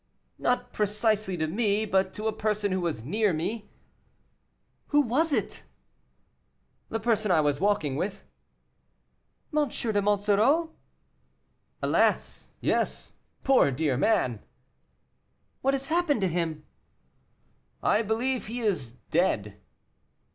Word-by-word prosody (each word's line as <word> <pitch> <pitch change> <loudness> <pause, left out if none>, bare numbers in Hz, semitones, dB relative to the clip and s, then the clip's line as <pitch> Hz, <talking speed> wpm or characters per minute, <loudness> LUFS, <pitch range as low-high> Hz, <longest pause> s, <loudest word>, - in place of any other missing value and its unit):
"Not 245 0 0
precisely 210 -2 0
to 155 - 0
me, 205 +5 +1
but 190 -2 +1
to 215 - -5
a 220 - +1
person 210 -2 -1
who 185 0 0
was 165 -10 -2
near 205 - +1
me." 205 +7 -3 1.2
"Who 295 0 +4
was 290 +6 +1
it?" - - -1 1.3
"The 225 - -2
person 220 -1 +1
I 170 -4 +4
was 145 -1 +1
walking 190 -9 +1
with." 185 +7 -3 1.3
"M. 300 -3 +2
de 215 -4 -1
Monsoreau?" 210 +11 +2 1.1
"Alas! - - +1
yes; - - -1 0.3
poor 265 - +5
dear 140 0 0
man." 125 - +1 1.2
"What 270 +1 +2
has 270 0 -4
happened 315 -6 +1
to 190 - +2
him?" 160 -3 -2 1.2
"I 215 - +3
believe 230 +4 -1
he 240 +3 -4
is 175 - -1 0.2
dead." 105 - 0
210 Hz, 115 wpm, -27 LUFS, 170-230 Hz, 1.3 s, poor